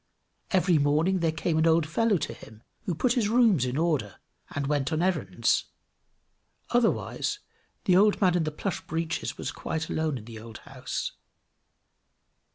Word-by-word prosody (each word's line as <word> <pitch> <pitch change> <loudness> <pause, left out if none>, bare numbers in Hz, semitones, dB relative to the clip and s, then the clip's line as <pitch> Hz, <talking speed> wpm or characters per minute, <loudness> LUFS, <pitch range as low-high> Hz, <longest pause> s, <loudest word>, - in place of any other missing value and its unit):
Every 180 -4 +3
morning 155 +6 +2
there 165 -2 +1
came 160 0 -1
an 160 - +3
old 165 -1 +4
fellow 210 +5 +2
to 155 -2 -4
him 110 0 -14 0.2
who 180 -6 -1
put 240 +8 +2
his 230 -5 +1
rooms 220 - +4
in 125 +2 -2
order, 150 - 0 0.3
and 140 -1 -3
went 145 -1 0
on 160 +2 0
errands; 115 - +1 1.1
otherwise, 240 - +1 0.5
the 180 - +4
old 205 +2 +5
man 185 -3 +3
in 175 - +2
the 155 - -2
plush 180 +4 -3
breeches 165 0 -3
was - - -4
quite 160 -1 -4
alone 155 -3 0
in 110 - -10
the 115 -1 -9
old 110 0 -10
house. - - -5
160 Hz, 165 wpm, -27 LUFS, 145-190 Hz, 1.1 s, old